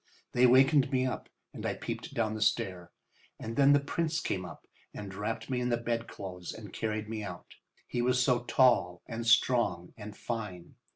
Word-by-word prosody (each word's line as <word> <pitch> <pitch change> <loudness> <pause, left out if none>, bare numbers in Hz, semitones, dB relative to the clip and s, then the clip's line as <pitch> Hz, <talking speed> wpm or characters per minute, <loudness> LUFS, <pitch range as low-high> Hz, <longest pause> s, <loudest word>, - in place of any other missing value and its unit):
They 125 +1 +5
wakened 135 +3 +5
me 130 -1 +2
up 130 - -4 0.2
and - - -8
I - - -1
peeped - - -6
down 110 0 0
the 110 - -5
stair. 100 -6 0 0.5
And 115 +1 -5
then 140 +1 +6
the 145 - +6
Prince 160 +3 -1
came 95 - -2
up 85 - -11 0.3
and 100 -2 -7
wrapped 105 +3 -3
me 125 -2 -1
in 125 - 0
the 120 - +2
bedclothes 115 -6 -4
and 105 -3 -10
carried 110 -1 -2
me 110 0 -4
out. 90 -4 -8 0.3
He 120 - -2
was 125 +1 +2
so 125 -1 +3
tall 120 -11 +3
and 115 0 -4
strong 115 -7 +3
and 105 -1 -9
fine. 105 -7 -5
115 Hz, 185 wpm, -31 LUFS, 100-125 Hz, 0.5 s, then